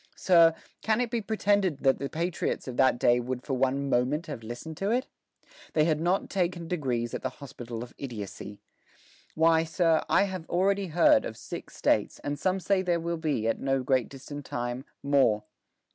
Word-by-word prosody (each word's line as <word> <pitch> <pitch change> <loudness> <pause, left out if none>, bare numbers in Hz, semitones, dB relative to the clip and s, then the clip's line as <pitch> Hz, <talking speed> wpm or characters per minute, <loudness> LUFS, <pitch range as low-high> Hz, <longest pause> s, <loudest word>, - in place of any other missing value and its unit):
Sir, 165 -3 +5 0.3
can 220 +1 +1
it 245 -2 -1
be 235 - 0
pretended 200 -7 +1
that 135 -1 +3
the 140 0 -3
patriots 170 -2 -2
of 125 - -5
that 130 -2 +4
day 120 0 +4
would 125 +1 -4
for 135 - -3
one 135 +2 +1
moment 135 +5 +1
have 115 - -6
listened 120 +8 -7
to 195 - -1
it?... 250 +4 +1 0.7
They 155 - +4
had 155 -2 +1
not 180 +4 +1
taken 175 -3 -1
degrees 125 -9 -2
at - - -3
the 130 - -2
hospital 120 -5 -7
of 120 - -12
idiocy.... 105 -5 -7 0.7
Why, 160 0 +4
sir, 165 0 +2
I - - +5
have 185 -4 -5
already 195 +2 +1
heard 165 -8 +4
of 110 - -6
six - - -8
States, - - +1
and 145 -1 -3
some 185 +4 +1
say 190 +1 +1
there 175 -2 +1
will 170 +1 -2
be, 150 -9 -1
at 115 - 0
no 135 -1 0
great 130 -2 +1
distant 145 +2 -8
time, 120 +1 -4 0.2
more. 135 -7 +3
150 Hz, 190 wpm, -28 LUFS, 125-175 Hz, 0.7 s, Sir